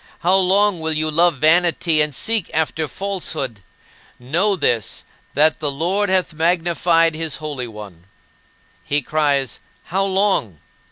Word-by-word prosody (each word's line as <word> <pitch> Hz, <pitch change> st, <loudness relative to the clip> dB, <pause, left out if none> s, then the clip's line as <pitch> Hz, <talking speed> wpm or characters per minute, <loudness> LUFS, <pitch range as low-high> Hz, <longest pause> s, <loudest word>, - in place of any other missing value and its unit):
How 180 Hz, +2 st, +3 dB
long 195 Hz, 0 st, +3 dB
will 160 Hz, 0 st, -1 dB
you 155 Hz, 0 st, 0 dB
love 170 Hz, +1 st, +3 dB
vanity, 165 Hz, +1 st, +3 dB
and 150 Hz, -2 st, 0 dB
seek 225 Hz, -, -1 dB
after 160 Hz, 0 st, -1 dB
falsehood? 160 Hz, -, -4 dB, 0.6 s
Know 170 Hz, +12 st, 0 dB
this, 115 Hz, -, -1 dB, 0.3 s
that 155 Hz, +3 st, +3 dB
the 150 Hz, -2 st, 0 dB
Lord 180 Hz, +8 st, -1 dB
hath 185 Hz, -2 st, 0 dB
magnified 165 Hz, 0 st, +1 dB
his 160 Hz, -1 st, -2 dB
Holy 145 Hz, -5 st, -4 dB
One." 105 Hz, -6 st, -12 dB, 0.8 s
He 145 Hz, +7 st, -1 dB
cries, 140 Hz, -4 st, 0 dB, 0.2 s
"How 195 Hz, +3 st, -1 dB
long?" 190 Hz, -, 0 dB
160 Hz, 130 wpm, -19 LUFS, 145-180 Hz, 0.8 s, How